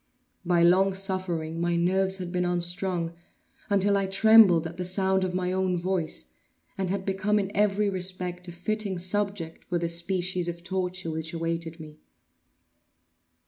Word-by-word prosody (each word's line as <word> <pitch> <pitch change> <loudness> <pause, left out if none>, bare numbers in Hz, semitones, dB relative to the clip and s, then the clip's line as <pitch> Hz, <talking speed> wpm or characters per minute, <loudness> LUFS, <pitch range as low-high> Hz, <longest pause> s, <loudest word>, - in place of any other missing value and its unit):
By 175 -1 +2
long 190 +2 +4
suffering 180 -4 -2
my 175 0 +1
nerves 190 +2 +1
had 180 -2 -6
been 180 0 0
unstrung, 175 -1 -1 0.6
until 200 0 +2
I 195 -1 0
trembled 195 -4 +6
at 165 +1 -7
the 180 - -3
sound 190 +1 +1
of 180 -1 -2
my 180 0 -1
own 185 -1 0
voice, 175 -2 -3 0.4
and 190 -2 -2
had 190 0 -2
become 200 +2 0
in 200 -1 -2
every 210 0 +2
respect 185 -1 -2
a - - -6
fitting 200 +2 -1
subject 185 -2 -2
for 175 - -1
the 170 0 -1
species 180 +1 0
of 170 0 -5
torture 180 -2 -3
which 160 +1 -5
awaited 165 0 -3
me. 155 -1 -11
185 Hz, 155 wpm, -27 LUFS, 170-190 Hz, 0.6 s, trembled